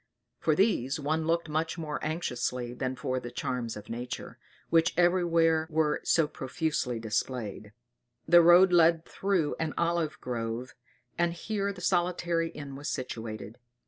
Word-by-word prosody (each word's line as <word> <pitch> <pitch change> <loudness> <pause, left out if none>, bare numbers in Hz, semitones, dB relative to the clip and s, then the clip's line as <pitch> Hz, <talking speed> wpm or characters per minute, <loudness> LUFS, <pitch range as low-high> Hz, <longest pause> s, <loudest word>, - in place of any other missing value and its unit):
For 155 - +2
these 150 - +1
one 155 +2 -1
looked 170 0 +1
much 160 +3 -2
more 155 -3 -4
anxiously 125 -6 -2
than 130 +1 -3
for 130 0 -2
the 120 - -7
charms 120 -2 -3
of 105 - -10
nature, 120 +2 -6 0.3
which 165 0 +3
every 175 +1 +4
where 165 -2 +2
were 155 -2 +1
so 165 -3 +3
profusely 135 -3 -2
displayed. 110 -2 -3 0.6
The 175 +1 +8
road 175 +2 +7
led 165 -1 +5
through 190 -6 0
an 160 -1 -2
olive 170 -2 0
grove, 120 0 -4 0.5
and 175 0 +2
here 200 +2 -2
the 185 -3 -10
solitary 175 -2 +1
inn 145 -3 -8
was 145 +2 -5
situated. 110 -3 -5
155 Hz, 145 wpm, -29 LUFS, 125-170 Hz, 0.6 s, The